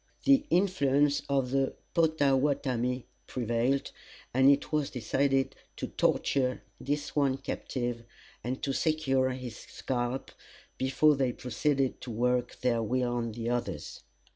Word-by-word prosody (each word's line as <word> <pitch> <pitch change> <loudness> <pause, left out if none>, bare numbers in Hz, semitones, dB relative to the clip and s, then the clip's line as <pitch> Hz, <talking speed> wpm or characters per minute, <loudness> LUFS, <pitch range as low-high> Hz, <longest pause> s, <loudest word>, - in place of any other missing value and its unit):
The 280 +1 +4
influence 145 - +3
of 135 -2 +1
the 135 0 +1 0.2
Pottawattamie 135 -5 +1 0.2
prevailed, 120 +3 0 0.4
and 130 +2 +6
it 140 0 +2
was 150 -2 +1
decided 135 +2 0 0.2
to - - -5
torture 130 -2 +1 0.2
this 145 +2 -3
one 140 -3 +2
captive, 120 -3 -4 0.4
and 125 +2 -4
to 135 - 0
secure 135 -4 +1
his 125 -3 -6
scalp, 125 0 -3 0.5
before 135 +3 +4
they 130 -3 0
proceeded 135 +2 -1
to 125 - -7
work 125 +2 0
their 120 -2 +2
will 125 +2 0
on 115 -2 -2
the 115 +1 -3
others. 120 0 -3
130 Hz, 125 wpm, -30 LUFS, 125-140 Hz, 0.5 s, and